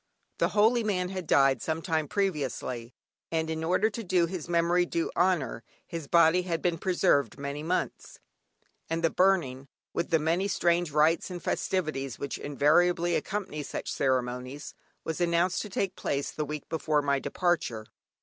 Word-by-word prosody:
The - - +3
holy 225 +3 +4
man 180 -4 0
had 185 -3 -5
died 135 -3 +4
some 160 0 -2
time 160 -4 0
previously, 135 - -2 0.4
and 160 -1 -1
in 160 0 -3
order 185 +6 +2
to 230 +2 -5
do 180 -3 +2
his 175 -1 -6
memory 170 +1 +3
due 170 -1 -2
honour, 170 -10 +1 0.2
his 165 -4 -6
body 170 +3 +5
had 170 -2 -2
been 170 -2 0
preserved 180 -7 +2
many 140 +1 -4
months, 170 +4 -3 0.7
and 165 +1 -2
the 165 - +3
burning, 160 -9 +2 0.3
with 170 - -2
the 165 - +4
many 165 +5 0
strange 175 -2 +1
rites 155 +4 +2
and 180 -1 -5
festivities 155 -10 -2
which 140 - -4
invariably 165 +5 +2
accompany 195 -7 -3
such - - -5
ceremonies, 130 +1 -2 0.3
was 160 +2 -3
announced 175 +1 +2
to 210 - -6
take 190 0 -2
place 140 0 -2
the 155 - -3
week 150 0 -6
before 155 -2 0
my 140 -1 +1
departure. 150 - -1
165 Hz, 160 wpm, -28 LUFS, 145-180 Hz, 0.7 s, body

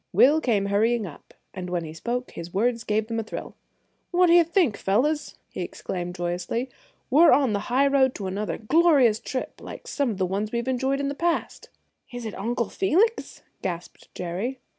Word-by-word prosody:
Will 300 +4 +5
came 210 -7 +1
hurrying 215 +3 +1
up, 160 -6 -12 0.2
and 180 -1 -6
when 175 -1 -1
he 155 -1 -7
spoke 240 +9 -3
his 170 +1 -8
words 230 +2 +1
gave 215 0 0
them 230 0 -3
a - - -2
thrill. 215 - -7 0.6
"What 355 -1 +4
d'ye 345 0 +8
think, 335 - +2
fellows," 285 +10 0 0.2
he - - -5
exclaimed 180 -1 -5
joyously; 180 +8 -3 0.4
"we're 315 +6 +7
on 270 -6 +4
the 205 +3 -3
highroad 270 0 +3
to 200 - -5
another 200 +3 -3
glorious 265 -3 +4
trip 255 - -5
like - - -9
some 280 -3 0
of 210 - -3
the 190 - +1
ones 200 +4 -2
we've 235 +1 -2
enjoyed 265 +2 0
in 280 - -1
the 280 - -2
past!" 340 +3 -2 0.4
"Is 245 -1 -6
it 220 - -4
Uncle 235 +2 -2
Felix?" 390 +5 +1 0.2
gasped 175 -2 -6
Jerry. 185 +9 -3
235 Hz, 185 wpm, -25 LUFS, 195-275 Hz, 0.6 s, d'ye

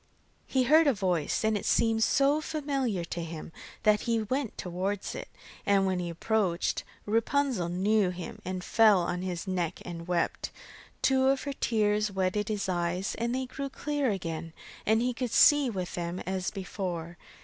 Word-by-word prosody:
He 260 -1 +2
heard 310 +5 +5
a 275 - +4
voice, 180 -3 0
and 220 0 +2
it 205 - -2
seemed 225 -1 +2
so 280 +5 +3
familiar 275 - -1
to 170 0 -4
him 165 0 -7 0.3
that 210 0 +5
he 225 -1 +2
went 255 +2 -2
towards 185 +3 -3
it, - - -6 0.4
and 200 -1 +3
when 185 -1 0
he 175 -1 -3
approached, 180 0 0 0.2
Rapunzel 230 -3 +1
knew 195 +2 +2
him 180 -1 -7
and 185 0 -4
fell 215 -4 +5
on 175 +1 -2
his 180 -1 -3
neck 180 -2 -1
and 170 -1 -7
wept. 175 -1 -1 0.5
Two 265 -1 +4
of 270 0 +2
her 280 - -3
tears 210 -4 +1
wetted 190 +2 0
his 210 -2 -1
eyes 180 +1 -1
and 235 +2 0
they 260 0 -1
grew 275 +2 -5
clear 290 -1 -1
again, 165 -5 -4 0.3
and 220 +2 +4
he 250 0 0
could 245 +1 -3
see 290 0 +6
with 185 -5 -4
them 175 +1 -3
as 190 0 -2
before. 180 -4 -5
205 Hz, 170 wpm, -29 LUFS, 180-240 Hz, 0.5 s, see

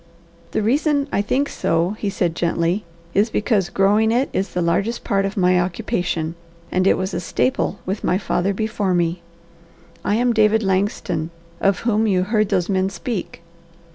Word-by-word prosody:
"The - - -1
reason 285 +4 +2
I - - +1
think 265 +7 0
so," 165 +3 0
he 205 - -1
said 175 -4 -1
gently, 170 +3 0 0.3
"is 210 +3 +3
because 205 -4 +1
growing 210 +4 +3
it 250 +4 +1
is 190 0 -1
the 180 - +1
largest 200 +8 0
part 195 -2 +1
of 195 +2 -4
my 180 -1 +4
occupation, 175 -2 -2 0.4
and 185 +1 +2
it - - +4
was 190 0 -3
a 170 - -1
staple 130 - 0
with 195 +3 -3
my 180 - +2
father 195 -1 0
before 205 -2 -1
me. 170 0 0 0.8
I 205 - +1
am 240 +1 +2
David 220 0 +3
Langston, 190 -4 -1 0.3
of 195 -1 +2
whom 220 -1 +1
you 185 -3 +2
heard 215 +1 +1
those 180 -1 +1
men 190 -1 +1
speak. 195 -2 -5
195 Hz, 170 wpm, -21 LUFS, 180-215 Hz, 0.8 s, my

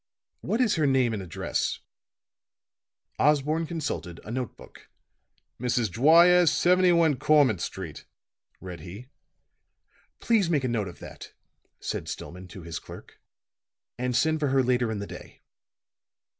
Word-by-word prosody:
"What 235 - -1
is 220 -7 +2
her 155 -2 +2
name 130 -4 +2
and 105 - -3
address?" 90 -4 -2 1.4
Osborne 150 +2 +2
consulted 150 - -4
a 105 - -8
note 125 -1 -4
book. - - -16 0.7
"Mrs. 120 -4 0
Dwyer, 170 - +6
71 175 -3 +3
Cormant 135 - +3
Street," 85 -4 -6 0.5
read 90 -2 -8
he. 95 - -10 1.1
"Please 215 -7 +2
make 150 -5 +1
a - - 0
note 115 -5 -1
of 90 - -10
that," - - -11 0.5
said - - -4
Stillman 90 +1 -8
to 90 0 -11
his 85 -1 -6
clerk. - - -13 0.8
"And 125 0 -1
send 160 +3 +2
for 150 - 0
her 135 0 +2
later 125 -1 +1
in 110 - -3
the 100 - -4
day." - - -12
130 Hz, 135 wpm, -26 LUFS, 100-160 Hz, 1.4 s, Dwyer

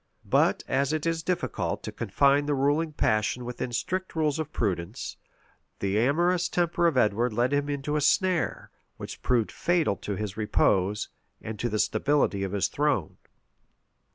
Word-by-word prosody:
But - - +2
as 140 +1 +1
it 155 0 -1
is 165 -1 0
difficult 180 +2 -2
to - - -5
confine 140 +6 +2
the 145 - +1
ruling 145 +4 +1
passion 110 -3 0
within 125 0 -4
strict 185 +11 -3
rules 155 -2 +1
of 155 -1 -3
prudence, 95 - -3 0.6
the 100 +1 0
amorous 175 +8 +2
temper 175 -1 +1
of 155 -6 0
Edward 115 +1 +2
led 120 +4 +1
him 145 0 0
into 145 +1 -2
a 150 - +1
snare, 165 - +1 0.3
which - - -8
proved 120 -4 +1
fatal 170 - +1
to 100 - -4
his 105 0 -5
repose, 105 -1 +1 0.3
and 110 -2 -7
to 120 - -1
the 110 - -1
stability 140 -4 +1
of 95 0 -3
his 100 - +1
throne. 145 - -1
140 Hz, 160 wpm, -27 LUFS, 110-155 Hz, 0.6 s, But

